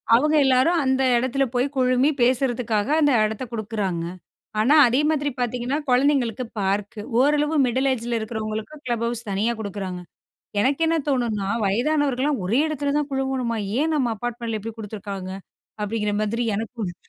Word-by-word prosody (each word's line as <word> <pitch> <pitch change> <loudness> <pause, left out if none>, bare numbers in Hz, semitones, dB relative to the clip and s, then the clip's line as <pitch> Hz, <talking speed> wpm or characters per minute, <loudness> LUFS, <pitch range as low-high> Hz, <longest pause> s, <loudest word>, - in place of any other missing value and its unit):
அவுங்க 300 +5 +3
எல்லாரும் 265 +7 +3
அந்த 265 0 +1 0.2
எடத்துல 260 +3 +1
போயி 250 +3 +1
குழுமி 255 +2 +3
பேசுறதுக்காக, 240 -3 +1
அந்த 290 - +4
எடத்த 220 +3 -2
கொடுக்குறாங்கங்க. 200 -6 -3 0.5
ஆனா, 255 +8 +4
அதே 255 +5 +2
மாதிரி 290 -2 0
பார்த்தீங்கன்னா 245 +3 -1
கொழந்தைங்களுக்கு 250 -2 +2 0.2
பார்க். 200 +2 -1 0.2
ஓரளவு 295 +3 +2
மிடில் 260 +3 +1
ஏஜில 235 -1 -2
இருக்கிறவங்களுக்கு 220 +4 -4
கிளப் 235 -2 -1
ஹவுஸ் 235 -1 -5
தனியா 215 +5 +1
குடுக்குறாங்க. 195 -3 -5 0.6
எனக்கு 275 +7 +1
என்ன 330 - +2
தோணுனா 235 -8 0 0.2
வயதானவர்கள்லாம் 275 +3 +1
ஒரே 230 +8 +2
எடத்துல 285 -2 -2
தான் 295 -1 -1
குழுவணுமா? 265 -3 -1 0.2
ஏன் 315 +1 +1
நம்ம 255 -5 +1
அப்பார்ட்மெண்ட்ல 235 -1 -3
இப்டி 225 +2 -6
குடுத்துருக்காங்க 200 -3 -6 0.5
அப்டிங்கிற 210 0 -1
மாதிரி 230 +3 -1
எனக்கும் 225 +2 -4
இருக்கு. 175 - -7
240 Hz, 145 wpm, -23 LUFS, 215-270 Hz, 0.6 s, அந்த